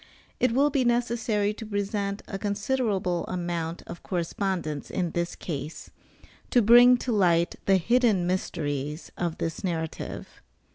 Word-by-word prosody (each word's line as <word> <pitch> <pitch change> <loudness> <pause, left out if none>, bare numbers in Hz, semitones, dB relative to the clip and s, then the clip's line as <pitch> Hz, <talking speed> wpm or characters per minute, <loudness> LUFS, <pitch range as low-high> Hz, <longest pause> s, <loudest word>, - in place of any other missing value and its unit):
It 250 - +3
will 285 +4 +3
be 270 -2 +2
necessary 235 -3 +1
to 225 - -8
present 205 -1 -2
a 195 - -5
considerable 205 -4 -1
amount 170 -2 -3
of - - -9
correspondence 175 -4 -2
in 175 -3 -1
this 170 0 -2
case, 150 -1 -6 0.6
to 245 -3 +4
bring 245 +3 +8
to 245 - -3
light 175 -5 +3
the 195 -1 +5
hidden 220 -1 +2
mysteries 150 -4 -3
of 170 -2 -2
this 165 -1 -4
narrative. 160 -4 -4
195 Hz, 135 wpm, -27 LUFS, 170-225 Hz, 0.6 s, bring